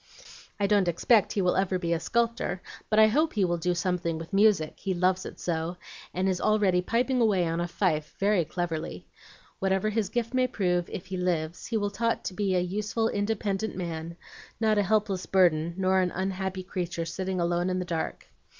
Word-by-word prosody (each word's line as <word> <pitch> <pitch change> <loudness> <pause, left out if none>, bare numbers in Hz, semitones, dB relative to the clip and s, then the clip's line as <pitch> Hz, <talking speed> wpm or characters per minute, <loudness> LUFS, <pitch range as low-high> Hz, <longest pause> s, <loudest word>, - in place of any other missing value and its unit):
"I 200 - +2
don't 200 -2 +3
expect 200 +5 +3
he 200 - 0
will 180 - +2
ever 190 0 +1
be 170 -2 -1
a 165 - 0
sculptor, 230 +1 -1 0.3
but 215 - +1
I 220 - +9
hope 305 +9 +2
he 205 -3 +2
will 175 -1 0
do 180 +2 0
something 170 -2 -1
with 165 +4 -9
music 195 -6 +3
he 190 -2 -2
loves 185 +1 +1
it - - -10
so, 170 +1 -2 0.3
and 185 +1 -1
is 185 -2 0
already 200 -4 +3
piping 245 +6 +1
away 200 -6 +3
on 165 +1 -1
a 175 - -1
fife 170 -4 -1
very 200 -2 +2
cleverly. 165 -1 -4 0.5
Whatever 190 +2 +1
his 215 -3 0
gift 240 0 -2
may 255 0 +3
prove, 180 -7 0
if 185 - -6
he 185 0 -5
lives, 170 -2 -2
he 230 - 0
will 205 -1 -1
be 200 - -13
taught 230 0 0
to - - -3
be 195 -1 0
a - - +3
useful, 210 +5 -1
independent 205 0 -1
man, 170 -2 -5 0.4
not 215 -2 +3
a - - +5
helpless 205 -2 0
burden, 170 -3 +3
nor 190 0 +3
an 180 -1 +2
unhappy 190 0 -3
creature 175 -2 -3
sitting 185 +2 -3
alone 175 +1 +1
in 185 - 0
the 180 - -2
dark. 165 -2 -3
185 Hz, 205 wpm, -28 LUFS, 175-210 Hz, 0.5 s, I